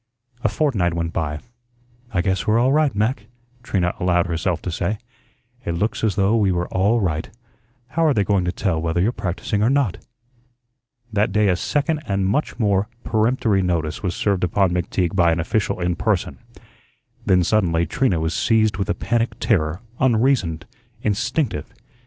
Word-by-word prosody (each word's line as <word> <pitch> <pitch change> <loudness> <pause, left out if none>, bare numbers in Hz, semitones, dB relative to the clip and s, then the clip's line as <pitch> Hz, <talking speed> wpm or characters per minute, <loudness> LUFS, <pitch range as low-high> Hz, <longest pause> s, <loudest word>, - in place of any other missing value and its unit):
A 110 - +3
fortnight 105 - 0
went 85 -1 -2
by. 75 -2 -2 0.7
"I 90 - +1
guess 95 +3 -1
we're 110 +1 +4
all 125 +3 +3
right, 150 -4 +2
Mac," 105 0 -1 0.3
Trina 90 -6 0
allowed 90 -1 +2
herself 85 0 -1
to 90 - -3
say. 85 +5 -1 0.7
"It 85 - -2
looks 105 +7 -1
as 110 -4 +1
though 100 +2 +2
we 100 -4 +3
were 90 -1 -1
all 100 +6 +2
right. 80 -5 -1 0.6
How 165 +6 +1
are 150 - +4
they 100 - +3
going 100 -1 +1
to 90 - 0
tell 85 -4 -1
whether 80 +1 -1
you're 100 +7 +2
practising 100 0 -2
or 110 - +3
not?" 135 -8 +1 1.1
That 105 0 +1
day 105 0 +3
a 90 - +3
second 150 - -1
and 100 -2 0
much 110 +11 0
more 100 -3 +1 0.2
peremptory 110 -2 +1
notice 85 -4 -1
was 90 -4 -2
served 100 -3 0
upon 90 +1 +2
McTeague 90 0 -1
by 85 -3 +4
an 80 - 0
official 95 +3 -1
in 90 0 0
person. - - -1 0.8
Then 90 -1 +3
suddenly 85 -4 +2
Trina 95 - +1
was 80 +1 -1
seized 110 -3 +2
with 100 - -2
a - - +1
panic 115 -1 -1
terror, 90 -6 +1 0.2
unreasoned, 115 -10 +2 0.4
instinctive. 115 +6 -1
100 Hz, 170 wpm, -21 LUFS, 85-110 Hz, 1.1 s, we're